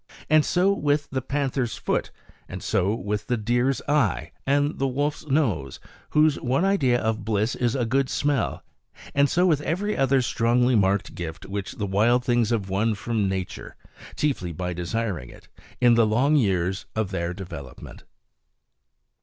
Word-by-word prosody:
And 155 Hz, -1 st, +6 dB
so 185 Hz, +5 st, +2 dB
with 145 Hz, -5 st, 0 dB
the 130 Hz, -1 st, -1 dB
panther's 135 Hz, -3 st, -2 dB
foot; -, -, -1 dB, 0.4 s
and -, -, -7 dB
so 95 Hz, +4 st, +1 dB
with 105 Hz, -1 st, -3 dB
the 125 Hz, -, 0 dB
deer's 120 Hz, +4 st, 0 dB
eye, 125 Hz, -, +1 dB, 0.2 s
and 145 Hz, +2 st, +1 dB
the 135 Hz, -, +1 dB
wolf's 145 Hz, +4 st, -2 dB
nose, 110 Hz, -, 0 dB, 0.3 s
whose 155 Hz, -1 st, +3 dB
one 135 Hz, +8 st, +1 dB
idea 135 Hz, -12 st, +2 dB
of 110 Hz, -3 st, -1 dB
bliss 110 Hz, +2 st, 0 dB
is 120 Hz, 0 st, 0 dB
a 125 Hz, -3 st, 0 dB
good 130 Hz, +3 st, +1 dB
smell; 140 Hz, -4 st, -1 dB, 0.5 s
and 140 Hz, 0 st, +3 dB
so 180 Hz, +1 st, +2 dB
with 155 Hz, -5 st, +3 dB
every 190 Hz, +8 st, -1 dB
other 135 Hz, -1 st, +2 dB
strongly 120 Hz, +2 st, +2 dB
marked 100 Hz, -2 st, +1 dB
gift 80 Hz, -2 st, -6 dB
which 100 Hz, 0 st, -5 dB
the 105 Hz, -, -3 dB
wild 115 Hz, +6 st, +2 dB
things 120 Hz, -3 st, +2 dB
have 110 Hz, -5 st, -1 dB
won 105 Hz, +3 st, 0 dB
from 105 Hz, -1 st, -1 dB
nature, 95 Hz, -1 st, -5 dB, 0.4 s
chiefly 130 Hz, -, -1 dB
by 90 Hz, +2 st, -4 dB
desiring 90 Hz, -, -3 dB
it, -, -, -15 dB, 0.3 s
in 120 Hz, -1 st, +5 dB
the 115 Hz, -1 st, +4 dB
long 130 Hz, +8 st, +2 dB
years 95 Hz, -, +1 dB
of 110 Hz, -3 st, -1 dB
their 85 Hz, -2 st, -2 dB
development. 90 Hz, -7 st, -9 dB
120 Hz, 160 wpm, -25 LUFS, 100-140 Hz, 0.5 s, And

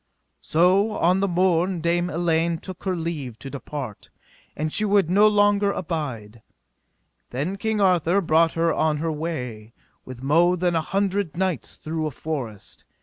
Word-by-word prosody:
So 185 Hz, +6 st, +3 dB
on 180 Hz, +1 st, +2 dB
the 200 Hz, -, +1 dB
morn 180 Hz, 0 st, +1 dB
Dame 175 Hz, +2 st, 0 dB
Elaine 170 Hz, 0 st, +1 dB
took 185 Hz, +2 st, -10 dB
her 185 Hz, -1 st, 0 dB
leave 155 Hz, -8 st, -4 dB
to 135 Hz, -, -9 dB
depart, 140 Hz, -5 st, -7 dB, 0.5 s
and 155 Hz, +1 st, -2 dB
she 215 Hz, -, +1 dB
would 200 Hz, -4 st, +2 dB
no 205 Hz, +3 st, +6 dB
longer 205 Hz, -1 st, +3 dB
abide. 130 Hz, -, -5 dB, 0.9 s
Then 145 Hz, +10 st, -3 dB
King 220 Hz, +1 st, -1 dB
Arthur 180 Hz, -1 st, +3 dB
brought 165 Hz, -2 st, +3 dB
her 165 Hz, -1 st, +1 dB
on 155 Hz, -1 st, +1 dB
her 160 Hz, +2 st, -2 dB
way 125 Hz, -9 st, -5 dB, 0.3 s
with 130 Hz, 0 st, -10 dB
mo 170 Hz, +6 st, +4 dB
than 175 Hz, -1 st, 0 dB
an 165 Hz, -, +2 dB
hundred 195 Hz, -1 st, -1 dB
knights 185 Hz, -6 st, -2 dB
through 155 Hz, 0 st, -3 dB
a -, -, -2 dB
forest. 130 Hz, -8 st, -6 dB
165 Hz, 155 wpm, -24 LUFS, 150-185 Hz, 0.9 s, no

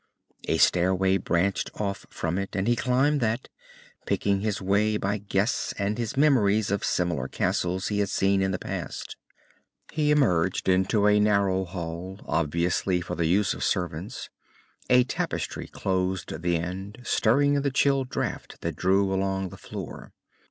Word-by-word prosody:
A -, -, +1 dB
stairway 95 Hz, +2 st, +3 dB
branched 95 Hz, +2 st, 0 dB
off 100 Hz, -2 st, -3 dB
from 85 Hz, +3 st, -2 dB
it, 100 Hz, -, -5 dB
and 95 Hz, +1 st, 0 dB
he 120 Hz, -, +4 dB
climbed 135 Hz, +4 st, +2 dB
that, 110 Hz, 0 st, -1 dB, 0.6 s
picking 100 Hz, -1 st, +1 dB
his 105 Hz, -2 st, -1 dB
way 105 Hz, +3 st, +2 dB
by 100 Hz, +1 st, -1 dB
guess 100 Hz, +3 st, -1 dB
and 105 Hz, +3 st, -1 dB
his 115 Hz, +1 st, -3 dB
memories 110 Hz, -9 st, +3 dB
of 100 Hz, -, -1 dB
similar 85 Hz, -7 st, 0 dB
castles 90 Hz, +6 st, -1 dB
he 105 Hz, -1 st, -1 dB
had 100 Hz, -1 st, +1 dB
seen 95 Hz, 0 st, +2 dB
in 95 Hz, -, +1 dB
the 95 Hz, -, -1 dB
past. -, -, -6 dB, 0.8 s
He 150 Hz, -1 st, +1 dB
emerged 95 Hz, -, +2 dB
into 95 Hz, +3 st, +3 dB
a 105 Hz, 0 st, +5 dB
narrow 100 Hz, -2 st, +2 dB
hall, 90 Hz, +1 st, -6 dB
obviously 85 Hz, +4 st, 0 dB
for 85 Hz, -, -5 dB
the 85 Hz, -, 0 dB
use 95 Hz, +4 st, +2 dB
of -, -, -5 dB
servants. 90 Hz, +4 st, -3 dB, 0.6 s
A 125 Hz, 0 st, +6 dB
tapestry 125 Hz, -, -3 dB
closed 95 Hz, -3 st, -2 dB
the 85 Hz, -1 st, +1 dB
end, 95 Hz, +6 st, -6 dB
stirring 140 Hz, +5 st, +3 dB
in 140 Hz, -, +2 dB
the 140 Hz, -, +1 dB
chill 135 Hz, 0 st, +2 dB
draught 125 Hz, -, -4 dB
that -, -, -3 dB
blew 95 Hz, +1 st, +2 dB
along 95 Hz, 0 st, -1 dB
the -, -, -10 dB
floor. -, -, -8 dB
100 Hz, 160 wpm, -26 LUFS, 90-110 Hz, 0.8 s, A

